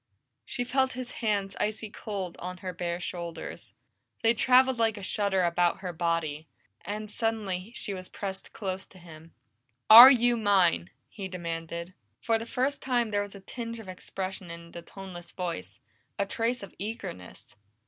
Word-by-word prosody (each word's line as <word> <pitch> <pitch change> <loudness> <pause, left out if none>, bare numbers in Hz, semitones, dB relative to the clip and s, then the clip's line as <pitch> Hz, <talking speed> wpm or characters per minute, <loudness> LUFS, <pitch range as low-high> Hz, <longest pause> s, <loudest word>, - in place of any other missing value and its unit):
She 245 - -2
felt 265 +1 +1
his 250 0 -6
hands 200 -3 0
icy 215 0 -2
cold 195 -6 -5
on 180 +1 -5
her 185 - -3
bare 170 0 -3
shoulders. 170 -2 -6 0.5
They 225 +1 +5
traveled 255 +1 +4
like 225 -1 +2
a 200 - -7
shudder 195 -1 +1
about 175 +1 +2
her 180 -2 -4
body, 165 -2 -1 0.4
and 210 +2 -5
suddenly 215 -4 -2
she 200 - -3
was 185 -1 -7
pressed 190 -1 -6
close 190 -2 -4
to 190 - -17
him. 165 -2 -14 0.6
"Are 235 +4 +14
you 240 -2 +4
mine?" 185 - +3 0.2
he 195 -3 -6
demanded. 170 -1 -5 0.3
For 225 -1 +1
the 225 - -6
first 265 +4 -1
time 245 -3 +1
there 205 0 +1
was 205 0 -6
a 200 - -10
tinge 230 +3 -6
of 220 - -10
expression 185 0 -5
in 170 0 -9
the 170 - -8
toneless 175 -1 -10
voice, 105 - -5 0.4
a 200 - +1
trace 230 +3 -1
of 200 - -9
eagerness. 140 - -7
195 Hz, 165 wpm, -29 LUFS, 175-225 Hz, 0.6 s, Are